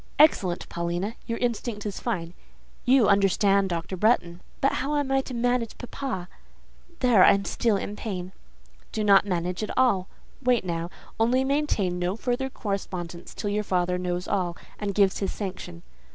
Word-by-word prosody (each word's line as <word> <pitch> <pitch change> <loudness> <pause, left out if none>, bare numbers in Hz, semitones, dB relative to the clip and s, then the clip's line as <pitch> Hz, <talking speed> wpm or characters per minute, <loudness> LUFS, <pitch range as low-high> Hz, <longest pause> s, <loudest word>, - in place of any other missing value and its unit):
"Excellent, 195 - +4
Paulina! 175 +5 -2
Your 230 - -2
instinct 235 -3 -2
is 205 -2 -4
fine; 175 -8 -3 0.5
you 250 -2 +5
understand 200 0 +3
Dr. 170 +2 -3
Bretton." 180 -4 +1 0.2
"But 275 - +3
how 290 +2 0
must 270 0 0
I - - -5
manage 245 -1 0
about 245 - -10
papa? 210 -11 -4 0.7
There 240 -7 +6
I - - +8
am 200 0 -1
still 225 -1 +1
in 205 +1 -4
pain." 185 -4 -5 0.6
"Do 215 - -2
not 200 0 +5
manage 180 0 -1
at 215 - -3
all. 200 -8 +3 0.3
Wait 245 -5 +2
now. 170 -1 -2 0.3
Only 245 +4 +3
maintain 265 -11 0
no 180 +2 0
further 250 +3 -1
correspondence 185 -6 -5
till 205 - -2
your 210 +1 0
father 180 -2 0
knows 180 0 -2
all, 180 -4 -1 0.2
and 200 -2 -3
gives 200 -2 +3
his 195 - -1
sanction." 185 - -6
200 Hz, 165 wpm, -26 LUFS, 180-240 Hz, 0.7 s, I